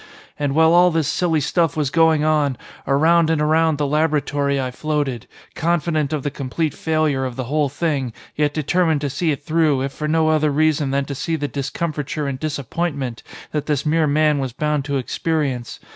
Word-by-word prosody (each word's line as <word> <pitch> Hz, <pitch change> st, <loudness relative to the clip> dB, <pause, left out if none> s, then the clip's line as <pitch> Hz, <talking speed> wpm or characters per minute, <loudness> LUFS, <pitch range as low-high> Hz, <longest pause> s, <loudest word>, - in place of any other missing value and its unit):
And 145 Hz, -1 st, -1 dB
while 160 Hz, +1 st, +5 dB
all 175 Hz, +1 st, +6 dB
this 160 Hz, -4 st, 0 dB
silly 165 Hz, -4 st, +1 dB
stuff 165 Hz, +1 st, 0 dB
was 145 Hz, -3 st, 0 dB
going 160 Hz, -1 st, +3 dB
on, 150 Hz, -4 st, +1 dB, 0.3 s
around 160 Hz, +4 st, +4 dB
and 160 Hz, -2 st, +1 dB
around 160 Hz, 0 st, +2 dB
the 145 Hz, -, 0 dB
laboratory 145 Hz, -2 st, 0 dB
I 130 Hz, -1 st, -2 dB
floated, 145 Hz, -4 st, -2 dB, 0.3 s
confident 160 Hz, -3 st, 0 dB
of 150 Hz, -3 st, -2 dB
the 145 Hz, -, -2 dB
complete 140 Hz, +3 st, -2 dB
failure 155 Hz, -4 st, 0 dB
of 130 Hz, -2 st, -4 dB
the 130 Hz, -, -3 dB
whole 145 Hz, +3 st, 0 dB
thing, 140 Hz, -4 st, -1 dB, 0.2 s
yet 150 Hz, -1 st, +1 dB
determined 160 Hz, +1 st, +1 dB
to 145 Hz, -2 st, -2 dB
see 170 Hz, +5 st, -1 dB
it 145 Hz, -1 st, -4 dB
through 155 Hz, -4 st, +2 dB
if 135 Hz, -, -3 dB
for 150 Hz, -, -4 dB
no 160 Hz, 0 st, +2 dB
other 155 Hz, -1 st, +2 dB
reason 150 Hz, -1 st, +1 dB
than 140 Hz, 0 st, 0 dB
to 140 Hz, -, -5 dB
see 165 Hz, +5 st, -2 dB
the 145 Hz, -2 st, -2 dB
discomfiture 150 Hz, +1 st, -3 dB
and 135 Hz, -2 st, -3 dB
disappointment 140 Hz, -3 st, -3 dB, 0.3 s
that 150 Hz, -1 st, -3 dB
this 150 Hz, -2 st, 0 dB
mere 155 Hz, 0 st, +2 dB
man 150 Hz, 0 st, +2 dB
was 130 Hz, -3 st, -3 dB
bound 150 Hz, 0 st, -1 dB
to 140 Hz, -1 st, -1 dB
experience. 135 Hz, -2 st, -2 dB
150 Hz, 190 wpm, -20 LUFS, 140-160 Hz, 0.3 s, all